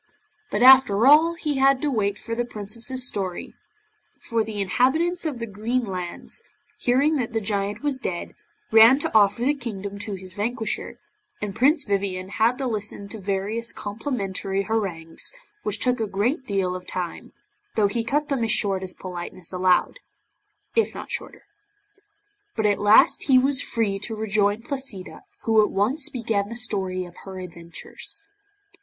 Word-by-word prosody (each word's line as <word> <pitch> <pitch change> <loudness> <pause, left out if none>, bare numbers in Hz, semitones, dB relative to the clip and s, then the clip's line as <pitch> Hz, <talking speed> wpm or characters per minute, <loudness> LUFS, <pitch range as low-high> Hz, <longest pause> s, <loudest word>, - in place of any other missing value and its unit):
But 210 - 0
after 255 -5 +7
all 315 +4 +6
he 300 -4 -2
had 270 0 +5
to 295 - +1
wait 205 -4 0
for 230 - -6
the 240 +1 0
Princess's 235 +3 -3
story, 190 -5 -4 0.7
for 230 -1 -1
the 215 -1 -5
inhabitants 270 - +1
of 300 -5 -2
the 230 - -4
Green 230 +4 -2
Lands, 180 -3 -5 0.4
hearing 280 +5 +2
that 240 -3 -3
the 225 - +1
Giant 200 +2 -2
was 285 -3 -1
dead, 175 -8 -4 0.4
ran 225 +4 +8
to 290 - -2
offer 210 +1 +4
the 285 +3 +3
kingdom 205 -7 -6
to 205 -1 -5
his 185 -1 -11
vanquisher, 220 +3 -3 0.4
and 205 -2 -4
Prince 290 +4 +3
Vivien 195 -3 -2
had 225 +5 +2
to 270 - -3
listen 210 -3 -4
to 220 - -7
various 205 +4 -2
complimentary 200 -4 -3
harangues, 190 -7 -1 0.3
which 210 0 -1
took 250 0 +1
a 220 - -1
great 240 - -1
deal 190 -3 0
of 180 0 -8
time, 180 -2 -5 0.4
though 215 - +3
he 225 +3 0
cut 290 +5 0
them 270 -4 -1
as 225 - 0
short 195 -2 +1
as 185 -1 -6
politeness 180 -1 -7
allowed 185 - +2 0.8
if 455 - +2
not - - -7
shorter. - - -5 1.1
But 220 - 0
at 205 -1 +2
last 215 +6 +5
he 265 -2 +5
was 265 +1 +3
free 205 -4 -1
to 220 +3 -4
rejoin 210 0 0
Placida, 265 - -6 0.2
who 220 -1 +4
at - - 0
once 245 +9 +1
began 220 -5 -1
the 230 - -6
story 190 -6 -1
of 175 0 -13
her 190 -1 -9
adventures. 170 - -6
215 Hz, 165 wpm, -24 LUFS, 195-250 Hz, 1.1 s, ran